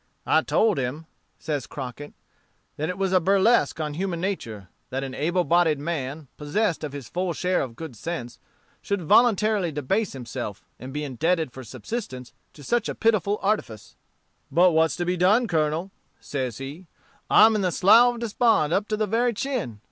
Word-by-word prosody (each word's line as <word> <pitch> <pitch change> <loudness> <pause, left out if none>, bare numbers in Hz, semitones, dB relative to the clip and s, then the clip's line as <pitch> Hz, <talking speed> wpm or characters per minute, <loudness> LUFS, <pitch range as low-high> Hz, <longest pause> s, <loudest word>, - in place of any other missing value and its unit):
"I - - +4
told 215 -8 +2
him," 135 +5 -4 0.3
says 145 -5 -4
Crockett, 140 +2 -8 0.6
"that 155 +3 -3
it 180 - -4
was 195 -1 0
a 185 - +6
burlesque 195 +4 +3
on 150 -2 -3
human 175 +1 -3
nature, 115 - -4 0.2
that 135 +1 -3
an 135 -1 -5
able 175 +6 0
bodied 170 -3 +3
man, 145 -1 -4
possessed 160 +4 -1
of 150 - -4
his 140 -4 -8
full 180 +4 -2
share 180 +3 0
of 120 -4 -5
good 160 -4 -8
sense, 120 -2 -6 0.4
should 200 -3 -2
voluntarily 210 -1 +3
debase 165 +9 -1
himself, 115 -5 -6
and 130 +2 -8
be 150 +2 -4
indebted 155 +3 0
for 130 - -9
subsistence 130 - -6 0.2
to 145 - -14
such 235 - 0
a - - -4
pitiful 210 -3 +1
artifice. 195 - -2 0.5
"'But 180 +2 +4
what's 160 0 +2
to 175 - -2
be 180 +1 0
done, 205 +8 +4
Colonel?' 160 0 -1 0.3
says 130 -5 -4
he. 145 +7 -8 0.4
'I'm 220 +1 +7
in - - -1
the 185 -2 +1
slough 230 +8 +5
of 235 - -9
despond, 220 -8 +2
up 205 +3 +1
to 215 - -1
the 215 - +1
very 235 +3 +1
chin. 235 - -3
170 Hz, 180 wpm, -25 LUFS, 140-200 Hz, 0.6 s, I'm